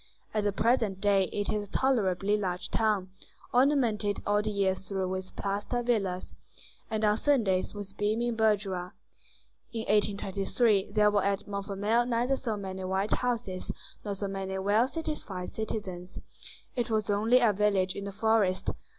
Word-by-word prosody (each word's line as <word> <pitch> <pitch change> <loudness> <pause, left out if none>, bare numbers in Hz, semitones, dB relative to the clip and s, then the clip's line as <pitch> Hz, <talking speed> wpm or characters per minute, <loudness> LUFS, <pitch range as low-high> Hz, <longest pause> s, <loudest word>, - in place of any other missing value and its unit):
At 215 -1 0
the 205 - +3
present 220 -2 +1
day 195 -1 +3
it 205 +3 -2
is 210 -1 -2
a - - -27
tolerably 205 -7 +2
large 185 -4 -2
town, 210 -4 +1 0.4
ornamented 240 -6 +2
all 205 0 +3
the 215 - -2
year 200 -2 +2
through 190 0 -3
with 185 0 -5
plaster 205 +5 -2
villas, 195 -7 -1 0.6
and 220 0 0
on 210 0 +4
Sundays 220 -10 +1
with 200 -1 -7
beaming 225 +3 0
bourgeois. 200 -5 +1 0.8
In 230 - -3
1823 205 0 +1
there 210 -1 +4
were 205 -1 +2
at 200 +1 -1
Montfermeil 205 +4 0
neither 245 +2 +1
so 230 -5 -3
many 190 -1 -5
white 190 +3 0
houses 225 -7 -2 0.3
nor 205 -2 -3
so 200 +1 -3
many 195 0 -3
well 205 +5 +3
satisfied 275 - -5
citizens: 190 -5 -5 0.6
it 240 -1 -1
was 215 -2 +1
only 220 +5 +4
a 235 -4 +4
village 195 -2 +2
in 200 - -5
the 200 - -4
forest. 210 -2 +2
205 Hz, 155 wpm, -29 LUFS, 195-220 Hz, 0.8 s, on